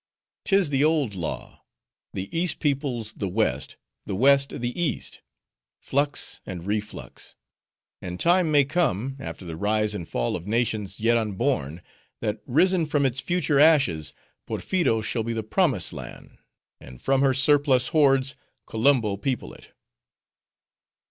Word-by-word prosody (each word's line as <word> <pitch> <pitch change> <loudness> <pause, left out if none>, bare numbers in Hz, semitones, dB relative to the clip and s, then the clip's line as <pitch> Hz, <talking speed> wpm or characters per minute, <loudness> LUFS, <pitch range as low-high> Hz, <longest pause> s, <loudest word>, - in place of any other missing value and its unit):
"'Tis 195 -6 +3
the 135 0 +2
old 150 -8 +2
law:—the 95 - -7
East 175 +1 0
peoples 135 -6 -1
the 100 - -4
West, 95 -8 -1 0.3
the - - -2
West 140 +4 +4
the 120 +7 -3
East; 170 - -2 0.6
flux 145 -1 -1
and 90 -2 -7
reflux. 105 +1 -5 0.7
And 90 0 -6
time 175 -1 +3
may 145 -2 +4
come, 135 - -1
after 115 -7 -7
the 85 -2 -6
rise 105 +3 0
and 90 -6 -6
fall - - -1
of 85 +2 -6
nations 110 -3 -1
yet 115 +2 +3
unborn, 100 - -2 0.4
that, 105 -1 -3
risen 170 +5 +3
from 145 -2 +1
its 130 0 0
future 175 -3 +1
ashes, 140 - +4 0.4
Porpheero 170 -12 0
shall 115 +1 -1
be 115 +1 -3
the 110 -1 -3
promised 110 - +1
land, - - -10 0.4
and 65 -1 -13
from 135 0 +1
her 135 -2 +3
surplus 135 -2 +3
hordes 135 -3 +3 0.3
Kolumbo 110 -3 +2
people 125 +4 -3
it." - - -15
125 Hz, 135 wpm, -25 LUFS, 105-145 Hz, 0.7 s, West